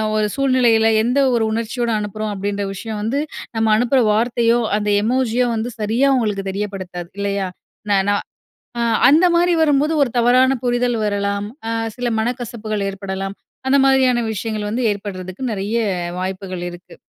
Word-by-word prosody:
ஒரு 215 0 +2
சூழ்நிலையில 250 -5 +3 0.2
எந்த 250 +4 +1
ஒரு 230 -2 +2
உணர்ச்சியோட 230 +2 -2
அனுப்புறோம் 210 +1 -4
அப்டின்ற 200 +1 -3
விஷயம் 210 +2 -5
வந்து 230 +7 -1 0.4
நம்ம 225 0 +1
அனுப்புற 245 +4 +2
வார்த்தையோ 235 +1 +2 0.2
அந்த 210 0 -1
எமோஜி 240 +1 0
யோ - - +3
வந்து 225 +2 -2
சரியா 225 +6 +1
அவுங்களுக்கு 210 -6 0
தெரியப்படுத்தாது, 190 -3 -5
இல்லையா? 200 -1 -1 0.4
நான் 195 -1 +3
நான் 205 0 +1 0.6
அ - - +1 0.3
அந்த 320 +5 +5
மாரி 350 +1 +3
வரும்போது 295 0 +3
ஒரு 265 - +1
தவறான 255 +2 +4
புரிதல் 245 0 +1
வரலாம். 200 0 -1 0.2
அ - - -1 0.3
சில 245 -1 -2
மனக்கசப்புகள் 220 -3 -3
ஏற்படலாம். 195 0 -5 0.3
அந்த 280 - +4
மாதிரியான 265 -2 +4
விஷயங்கள் 215 0 -3
வந்து 240 +4 -1
ஏற்படுறதுக்கு 195 0 -6
நெறைய 205 +3 -1 0.4
வாய்ப்புகள் 185 -1 -4
இருக்கு. 175 +1 -13
220 Hz, 150 wpm, -19 LUFS, 200-245 Hz, 0.6 s, அந்த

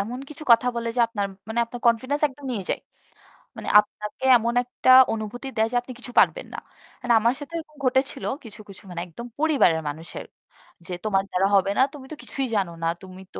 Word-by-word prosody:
এমন 230 +5 -4
কিছু 305 +1 -10
কথা 235 +2 +4
বলে, 235 0 -2
যে - - +3
আপনার 205 -3 -2 0.2
মানে 220 - -3
আপনার 240 +1 -9
কনফিডেন্স 255 +5 +2
একদম 280 +1 -15
নিয়ে 200 -6 -4
যায়। - - -1 0.8
মানে - - -7
আপনাকে 210 +3 -5
এমন 235 +1 -1
একটা 250 +1 -2 0.2
অনুভূতি 225 +4 -5
দেয় 220 +1 +3
যে, - - -3
"আপনি 250 - -11
কিছু 245 - -9
পারবেন - - +2
না।" - - -5 0.4
মানে 245 -1 +2
আমার 230 +3 +2
সাথে 290 +3 -10
এরকম 305 -2 -9
ঘটেছিল 265 +1 0 0.2
কিছু, 215 -2 -11
কিছু 195 +2 -13
মানে 175 -1 -5
একদম 235 +8 -9
পরিবারের 280 - +3
মানুষের। 160 +3 -8 0.6
যে, 185 - -9
"তোমার 195 -2 +2
দ্বারা 185 +2 +2
হবে 195 0 +3
না, - - +4
তুমি 280 -3 -10
তো - - -5
কিছুই 270 -1 -3
জানো 190 -4 0
না। 165 - +1
তুমি 185 -1 -11
তো - - -5
235 Hz, 205 wpm, -24 LUFS, 200-260 Hz, 0.8 s, কথা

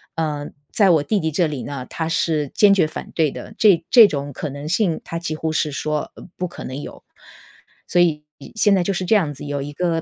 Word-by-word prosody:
嗯， 150 -3 -3 0.2
在 200 -4 +4
我 160 -3 +4
弟 205 +8 0
弟 160 -3 -1
这 170 +3 +1
里 145 -4 -5
呢， 135 -3 -6
他 160 - -3
是 160 -2 0
坚 205 -1 +4
决 190 -5 +4
反 155 - -7
对 155 -4 +2
的。 215 - -9
这 200 -6 +4
这 235 -4 +9
种 145 -5 -4
可 150 +3 -5
能 145 +2 -7
性， 175 -2 +1
他 165 - -5
几 165 -2 -4
乎 160 +1 -2
是 155 -1 0
说： 150 +2 -3
“呃 - - -12
不 180 - -2
可 - - -10
能 130 +2 -6
有。” - - -10 0.8
所 175 - +1
以 155 -4 +1 0.3
现 210 -2 +4
在 185 - +2
就 195 - -1
是 185 0 -3
这 220 - +3
样 165 -8 +1
子， 140 - -10
有 145 -1 -3
一 145 - -6
个 165 0 -1
160 Hz, 260 characters per minute, -21 LUFS, 145-180 Hz, 0.8 s, 这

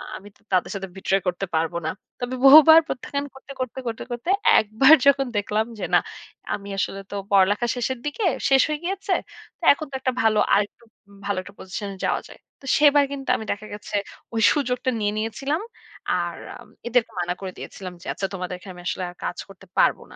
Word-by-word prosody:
আমি 200 - -10
তো - - -29
তাদের 185 -2 +1
সাথে 195 -1 -4
betray 195 0 +1
করতে 180 +2 -1
পারব 160 +2 0
না। - - 0 0.3
তবে 245 +1 -3
বহুবার 310 +3 +10
প্রত্যাখ্যান 280 +1 -4
করতে, 270 +1 -13
করতে, 255 0 -4
করতে, 225 -1 -4
করতে 240 +8 -4 0.3
একবার 220 +8 +5
যখন 275 -1 +4
দেখলাম 210 +2 0
যে - - -2
না - - +7 0.5
আমি 200 0 -6
আসলে 195 0 -2
তো - - -5 0.2
পড়ালেখা 200 +4 +4
শেষের 250 +1 -2
দিকে, 295 +9 -3 0.3
শেষ 270 -1 +6
হয়ে 300 - -2
গিয়েছে। 385 +1 -2 0.5
তো - - -19
এখন 310 +1 -7
তো - - -6
একটা 260 0 0
ভালো 220 -1 +3
আরেকটু 205 +3 0 0.4
ভালো 200 -1 -1
একটা 200 +2 -13
পজিশন 195 +2 -6
এ - - -14
যাওয়া - - 0
যায়। - - -15 0.2
তো - - -14
সেবার 290 -1 +6
কিন্তু 275 -1 -6
আমি 220 - -5
দেখা 205 +1 -5
গেছে 205 0 -7 0.4
ওই 225 - 0
সুযোগটা 260 -3 -1
নিয়ে 205 -1 0
নিয়েছিলাম। 270 - -2 0.6
আর - - -3 0.2
আম - - -15 0.2
এদেরকে 240 -1 +1
মানা 175 0 -1
করে 190 -1 -5
দিয়েছিলাম। 185 -2 -8
যে - - -14
আচ্ছা 195 - -3
তোমাদের 180 -1 -4
এখানে 185 +1 -11
আমি 175 - -11
আসলে 185 - -2 0.2
কাজ 175 - -3
করতে 195 0 -15
পারব - - +4
না। - - -12
220 Hz, 200 wpm, -23 LUFS, 195-270 Hz, 0.6 s, বহুবার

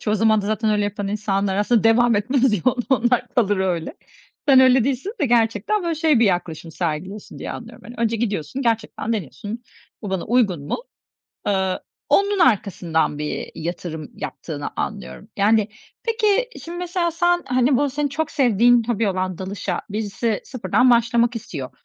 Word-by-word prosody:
Çoğu 210 - 0
zaman 215 0 +3
da 200 - -4
zaten 215 0 0
öyle 210 -1 +1
yapan 205 -1 -3
insanlar 200 -2 -1
aslında 215 +2 +2
devam 230 0 +4
etmez 255 +4 +2
ya 210 - +1
o 255 - +3
onlar 245 -1 +2
kalır 205 -4 +2
öyle. 180 -4 -1 0.5
Sen 265 -1 +8
öyle 255 -2 +5
değilsin 275 - -2
ve 290 - +3
gerçekten, 230 - +1
böyle, 335 -1 -1
şey 315 -4 +3
bir - - +6
yaklaşım 170 -4 -1
sergiliyorsun 180 +5 -4
diye - - -5
anlıyorum: - - -10
Hani, 240 - -10
önce 230 0 0
gidiyorsun, 215 - -2
gerçekten 225 0 -1
deniyorsun, 205 - -5 0.4
"Bu 205 - -5
bana 190 -2 -2
uygun 205 - +1
mu?" - - -1 0.7
Eee, 190 -2 +1 0.3
onun 400 0 +3
arkasından 180 - +1
bir 150 0 -4
yatırım 160 -2 -5
yaptığını 145 -3 -6
anlıyorum, 65 -1 -5
yani. 210 +1 +3 0.3
Peki 460 +1 +1 0.2
şimdi 340 +1 -6
mesela 355 -1 -1
sen, 350 +1 +1
hani, 255 +1 +2
bu 285 +2 +1
senin 285 +2 -1
çok 315 +3 -2
sevdiğin 240 -2 +4
hobi 225 -3 +1
olan 185 -1 -2
dalışa 190 +2 -3
birisi 210 +1 -2
sıfırdan 245 +1 +2
başlamak 235 0 +3
istiyor. 140 - -6
220 Hz, 165 wpm, -22 LUFS, 195-255 Hz, 0.7 s, Sen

